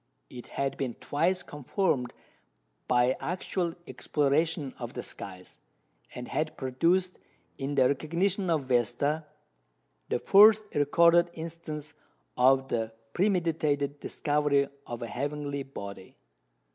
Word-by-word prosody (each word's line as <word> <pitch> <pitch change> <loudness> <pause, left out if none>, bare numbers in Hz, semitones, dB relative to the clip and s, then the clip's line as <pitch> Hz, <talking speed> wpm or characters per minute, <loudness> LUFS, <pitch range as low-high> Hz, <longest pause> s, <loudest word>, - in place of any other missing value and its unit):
It 120 - -9
had 135 -1 -1
been 130 -4 -3
twice 175 +5 0
confirmed 145 - -1 0.8
by 125 +1 +3
actual 175 -1 -2
exploration 145 +2 0
of - - -6
the - - -5
skies, 90 -2 -9 0.6
and 125 - -6
had 155 0 -2
produced, 170 +8 +1 0.4
in 140 +1 -2
the 130 - +5
recognition 175 +7 0
of 160 -4 +1
Vesta, 130 +5 0 0.8
the - - +1
first 215 +2 +7
recorded 170 +4 +4
instance 160 -2 -7 0.4
of 135 +1 +4
the 115 -1 -1 0.2
premeditated 160 -7 +1
discovery 145 -2 +1 0.2
of 120 0 -5
a - - -4
heavenly 140 +2 -3
body. 100 -8 -9
145 Hz, 110 wpm, -29 LUFS, 130-170 Hz, 0.8 s, first